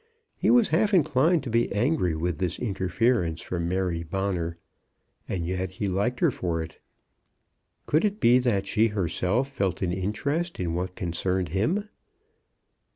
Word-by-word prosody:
He -, -, 0 dB
was 240 Hz, -3 st, +5 dB
half 200 Hz, +5 st, +3 dB
inclined 155 Hz, 0 st, +3 dB
to 125 Hz, -, -5 dB
be 115 Hz, +1 st, +2 dB
angry 105 Hz, -, +1 dB
with 80 Hz, 0 st, -2 dB
this 90 Hz, -2 st, -1 dB
interference 95 Hz, -3 st, 0 dB
from 85 Hz, -1 st, -3 dB
Mary 90 Hz, -2 st, -1 dB
Bonner; 85 Hz, -1 st, -2 dB, 0.7 s
and 85 Hz, -3 st, -2 dB
yet 95 Hz, +1 st, -3 dB
he 100 Hz, +1 st, -2 dB
liked 100 Hz, +7 st, -1 dB
her -, -, +4 dB
for 85 Hz, -2 st, -2 dB
it. 80 Hz, -, -11 dB, 1.1 s
Could 155 Hz, +3 st, +2 dB
it 210 Hz, 0 st, 0 dB
be 125 Hz, -, +5 dB
that 110 Hz, -6 st, +1 dB
she 110 Hz, +3 st, +3 dB
herself 100 Hz, -, 0 dB
felt 95 Hz, -8 st, -1 dB
an 90 Hz, -1 st, 0 dB
interest 140 Hz, -, -2 dB
in 85 Hz, -3 st, -1 dB
what 90 Hz, +1 st, -3 dB
concerned 90 Hz, 0 st, -1 dB
him? 160 Hz, -, 0 dB
95 Hz, 155 wpm, -26 LUFS, 90-125 Hz, 1.1 s, was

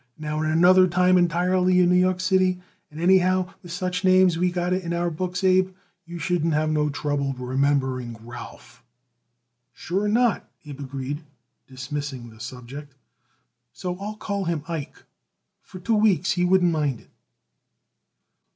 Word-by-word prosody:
Now 155 Hz, 0 st, -3 dB
is 155 Hz, -, 0 dB
another 180 Hz, +3 st, +5 dB
time 180 Hz, +1 st, +3 dB
entirely 180 Hz, +1 st, +2 dB
in 180 Hz, -1 st, +4 dB
New 180 Hz, -, +4 dB
York 185 Hz, 0 st, +2 dB
City; 185 Hz, -1 st, +2 dB, 0.3 s
and 150 Hz, -, -11 dB
anyhow, 185 Hz, +1 st, +3 dB
with 175 Hz, -, -11 dB
such 180 Hz, +2 st, -3 dB
names 185 Hz, -2 st, +5 dB
what 165 Hz, -, -4 dB
we 180 Hz, 0 st, +2 dB
got 175 Hz, 0 st, -1 dB
it 185 Hz, -, 0 dB
in 170 Hz, -1 st, -4 dB
our 170 Hz, 0 st, -1 dB
books, 180 Hz, +3 st, -4 dB
Abe, 185 Hz, 0 st, +3 dB, 0.3 s
you 170 Hz, 0 st, -7 dB
shouldn't 165 Hz, -2 st, 0 dB
have 155 Hz, +1 st, +1 dB
no 150 Hz, -1 st, +1 dB
trouble 145 Hz, -2 st, -2 dB
remembering 130 Hz, -2 st, -1 dB
Ralph." 120 Hz, -, -11 dB, 0.9 s
"Sure 195 Hz, +4 st, -2 dB
not," 230 Hz, 0 st, +1 dB, 0.2 s
Abe 145 Hz, -2 st, -9 dB
agreed, 140 Hz, +2 st, -5 dB, 0.5 s
dismissing 130 Hz, -2 st, -6 dB
the 110 Hz, -, -17 dB
subject. 130 Hz, +4 st, -9 dB, 0.8 s
"So, 180 Hz, +3 st, -4 dB
I'll 210 Hz, +2 st, -5 dB
call 200 Hz, -2 st, -3 dB
him 165 Hz, -4 st, -2 dB
Ike. 165 Hz, -4 st, -6 dB, 0.6 s
For -, -, -12 dB
two 220 Hz, +4 st, +1 dB
weeks 195 Hz, -5 st, +2 dB
he 180 Hz, -1 st, +1 dB
wouldn't 180 Hz, -1 st, +3 dB
mind 145 Hz, -7 st, -1 dB
it." -, -, -26 dB
175 Hz, 155 wpm, -24 LUFS, 145-185 Hz, 0.9 s, another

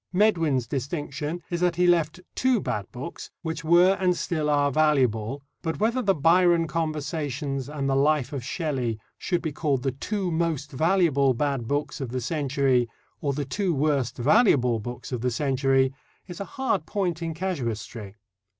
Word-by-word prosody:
Medwin's 165 Hz, -, +2 dB
distinction 145 Hz, +5 st, -4 dB
is 175 Hz, 0 st, -1 dB
that 180 Hz, -1 st, +2 dB
he 180 Hz, +1 st, +2 dB
left 170 Hz, 0 st, +2 dB
two 255 Hz, -3 st, +2 dB
bad 105 Hz, -, -3 dB
books 130 Hz, +7 st, -7 dB
which 160 Hz, 0 st, -4 dB
were 175 Hz, +4 st, +5 dB
and 180 Hz, -2 st, +2 dB
still 155 Hz, -4 st, -1 dB
are 145 Hz, -1 st, +3 dB
valuable, 135 Hz, -4 st, +1 dB, 0.2 s
but 160 Hz, -1 st, -3 dB
whether 230 Hz, +4 st, +1 dB
the 195 Hz, -4 st, +2 dB
Byron 170 Hz, +2 st, +4 dB
Conversations 150 Hz, -4 st, -3 dB
and 145 Hz, -2 st, -3 dB
the 135 Hz, -, +2 dB
Life 145 Hz, -1 st, +2 dB
of 135 Hz, -4 st, -4 dB
Shelley 130 Hz, -, -2 dB, 0.2 s
should 175 Hz, -3 st, -1 dB
be 160 Hz, -, -1 dB
called 140 Hz, -4 st, -1 dB
the 135 Hz, -, +1 dB
two 185 Hz, -, -3 dB
most 160 Hz, -4 st, -1 dB
valuable 150 Hz, -4 st, +3 dB
bad 135 Hz, -3 st, -1 dB
books 145 Hz, +2 st, -2 dB
of 130 Hz, -, -3 dB
the 130 Hz, +2 st, -2 dB
century 135 Hz, -2 st, +1 dB, 0.3 s
or 140 Hz, -2 st, 0 dB
the 145 Hz, +1 st, -2 dB
two 180 Hz, +5 st, -1 dB
worst 140 Hz, -4 st, 0 dB
valuable 125 Hz, -, +4 dB
books 120 Hz, +5 st, -7 dB
of 125 Hz, -3 st, -2 dB
the 125 Hz, -, +1 dB
century 135 Hz, 0 st, +1 dB, 0.3 s
is 175 Hz, -2 st, -8 dB
a 200 Hz, -, -3 dB
hard 265 Hz, +4 st, -2 dB
point 180 Hz, -5 st, -1 dB
in 165 Hz, -1 st, -3 dB
casuistry." 115 Hz, -, -4 dB
150 Hz, 170 wpm, -26 LUFS, 130-170 Hz, 0.3 s, were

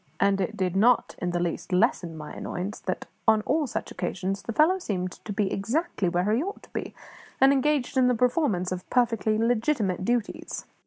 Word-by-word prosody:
And 195 Hz, 0 st, +3 dB
it 185 Hz, -, -2 dB
did 185 Hz, -1 st, -1 dB
not 235 Hz, +5 st, +4 dB
in 180 Hz, -, 0 dB
the 175 Hz, 0 st, -1 dB
least 175 Hz, +1 st, -3 dB
lessen 180 Hz, -4 st, +1 dB
my 150 Hz, -1 st, -8 dB
annoyance 190 Hz, +4 st, -5 dB
that, -, -, -4 dB, 0.2 s
on 220 Hz, -1 st, +5 dB
all 305 Hz, +3 st, +1 dB
such -, -, -4 dB
occasions, 195 Hz, +2 st, -3 dB
the -, -, -5 dB
fellow 320 Hz, -, +4 dB
seemed 185 Hz, -, -2 dB
to 215 Hz, -, -6 dB
be 205 Hz, -1 st, 0 dB
exactly 225 Hz, -, -1 dB
where 180 Hz, +4 st, +1 dB
he 235 Hz, -, +2 dB
ought 395 Hz, +5 st, -5 dB
to -, -, -18 dB
be, -, -, -4 dB, 0.4 s
and 270 Hz, +1 st, +6 dB
engaged 280 Hz, -1 st, +1 dB
in 255 Hz, -1 st, +5 dB
the 250 Hz, -, +3 dB
performance 235 Hz, -, +1 dB
of 180 Hz, -1 st, -5 dB
perfectly 230 Hz, -3 st, +2 dB
legitimate 225 Hz, -, +1 dB
duties. 235 Hz, +1 st, -2 dB
215 Hz, 195 wpm, -26 LUFS, 185-250 Hz, 0.4 s, and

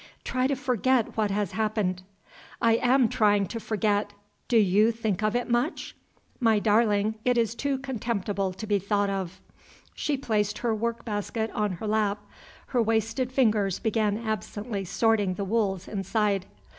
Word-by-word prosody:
"Try 255 Hz, 0 st, 0 dB
to 280 Hz, -, 0 dB
forget 255 Hz, -2 st, +1 dB
what 215 Hz, -2 st, +1 dB
has 200 Hz, -2 st, -1 dB
happened." 210 Hz, -4 st, -1 dB, 0.6 s
"I 230 Hz, -1 st, +4 dB
am 250 Hz, 0 st, +4 dB
trying 205 Hz, -2 st, +3 dB
to 230 Hz, -, -4 dB
forget. 210 Hz, -2 st, 0 dB, 0.3 s
Do 235 Hz, -, +3 dB
you 210 Hz, +2 st, +4 dB
think 220 Hz, -4 st, -2 dB
of 215 Hz, +1 st, +1 dB
it 245 Hz, -, 0 dB
much?" 240 Hz, +7 st, -1 dB, 0.4 s
"My 225 Hz, -4 st, +4 dB
darling, 215 Hz, 0 st, +2 dB
it 250 Hz, -1 st, +2 dB
is 230 Hz, -1 st, +1 dB
too 275 Hz, +3 st, -1 dB
contemptible 215 Hz, -7 st, -2 dB
to 205 Hz, +4 st, -7 dB
be 205 Hz, -1 st, +1 dB
thought 200 Hz, +1 st, 0 dB
of." 190 Hz, -3 st, -4 dB, 0.5 s
She 295 Hz, -2 st, -1 dB
placed 210 Hz, -5 st, 0 dB
her 235 Hz, -2 st, 0 dB
work 230 Hz, +2 st, -2 dB
basket 220 Hz, +1 st, -2 dB
on 210 Hz, -2 st, -1 dB
her 180 Hz, +5 st, -6 dB
lap. 210 Hz, -1 st, 0 dB, 0.4 s
Her 250 Hz, -3 st, +2 dB
wasted 225 Hz, +3 st, 0 dB
fingers 215 Hz, -7 st, +2 dB
began 215 Hz, -2 st, 0 dB
absently 215 Hz, -1 st, -4 dB
sorting 205 Hz, 0 st, +1 dB
the 200 Hz, -, -3 dB
wools 195 Hz, -3 st, 0 dB
inside. 200 Hz, -1 st, -1 dB
215 Hz, 155 wpm, -27 LUFS, 205-230 Hz, 0.6 s, I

